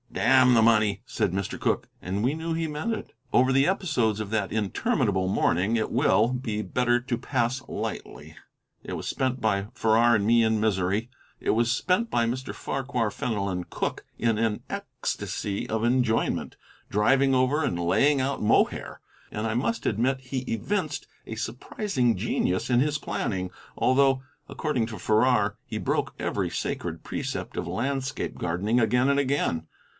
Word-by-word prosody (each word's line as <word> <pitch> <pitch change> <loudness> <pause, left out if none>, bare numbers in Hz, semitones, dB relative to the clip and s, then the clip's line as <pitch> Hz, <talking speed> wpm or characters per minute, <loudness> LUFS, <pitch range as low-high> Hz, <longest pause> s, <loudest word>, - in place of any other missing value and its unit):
"Damn 130 0 +5
the 115 - +5
money!" 110 -2 +3
said 105 -4 -1
Mr. 95 +1 -3
Cooke, - - 0
and 95 +3 -2
we 130 +4 +2
knew 165 +1 -3
he 165 0 -1
meant 150 +8 -3
it. - - -6 0.2
Over 130 +1 +4
the 135 +1 +4
episodes 140 - +1
of 110 -2 -4
that 105 -4 0
interminable 105 - 0
morning 95 +3 +2
it 110 - -1
will, 120 -3 +3
be 125 -4 -2
better 120 +5 +1
to 120 -1 -3
pass 130 0 -1
lightly. - - -6 0.5
It - - -6
was - - -5
spent 130 -1 -1
by 100 -3 0
Farrar 115 0 +4
and 100 -2 +1
me 115 +1 +5
in 110 -1 +2
misery. 105 +1 0 0.3
It - - 0
was 115 +1 +2
spent 185 - +1
by 120 -1 +2
Mr. 130 +3 -3
Farquhar 130 -4 -2
Fenelon 100 -5 -2
Cooke - - -3
in 115 -1 +1
an 110 -1 0
ecstasy 100 -1 -4
of 110 0 -1
enjoyment, 120 -1 +1 0.3
driving 135 +6 +3
over 130 +4 +2
and 85 - -1
laying 135 +12 +3
out 135 +1 -1
Mohair, 105 - +1 0.3
and 105 +1 -2
I 110 - -1
must 145 - -1
admit 130 +5 +1
he 130 0 -3
evinced 150 - -2 0.2
a 110 - -6
surprising 120 - -1
genius 95 +6 0
in 120 -1 +4
his 150 +3 +1
planning, 95 -9 -3 0.3
although, 135 0 +3 0.3
according 130 -8 -1
to 110 -2 -7
Farrar, 110 -1 +2
he - - -5
broke - - -1
every - - -1
sacred - - -4
precept - - -4
of - - -3
landscape 130 +8 -2
gardening 95 +8 0
again 125 +3 +3
and 140 0 +3
again. 130 - 0
120 Hz, 160 wpm, -26 LUFS, 105-135 Hz, 0.5 s, Damn